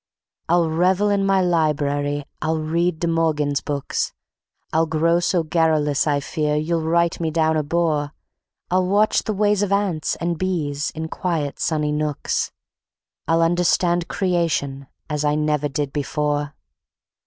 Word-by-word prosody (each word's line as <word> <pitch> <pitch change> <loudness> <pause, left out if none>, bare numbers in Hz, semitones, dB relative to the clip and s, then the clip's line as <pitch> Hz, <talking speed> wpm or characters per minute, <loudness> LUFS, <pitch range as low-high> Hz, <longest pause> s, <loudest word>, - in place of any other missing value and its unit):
I'll 170 -1 +3
revel 180 +5 +2
in 200 -1 +1
my 195 -1 +3
library; 145 -4 0 0.2
I'll 160 +1 0
read 160 +2 -1
De 170 - +1
Morgan's 155 -4 +1
books; 145 -2 -2 0.6
I'll 160 +1 +3
grow 165 +2 +2
so 175 0 +1
garrulous 155 -3 +1
I 145 -1 +2
fear 150 +1 -1
you'll 160 +2 0
write 170 +1 +1
me 165 -2 0
down 160 0 +1
a 155 - +2
bore; 150 -1 0 0.6
I'll 185 0 +2
watch 205 +3 +3
the 215 - -3
ways 205 0 +2
of 205 -1 0
ants 195 -6 0
and 170 -1 -2
bees 155 -6 -1
in 160 0 -4
quiet 160 -4 -2
sunny 150 -2 0
nooks, 150 -1 -1 0.8
I'll 165 0 +3
understand 175 0 +2
Creation 165 -7 -1 0.2
as 150 -1 -2
I 150 0 +2
never 150 -1 0
did 140 0 -3
before. 145 0 -1
160 Hz, 145 wpm, -22 LUFS, 150-175 Hz, 0.8 s, I'll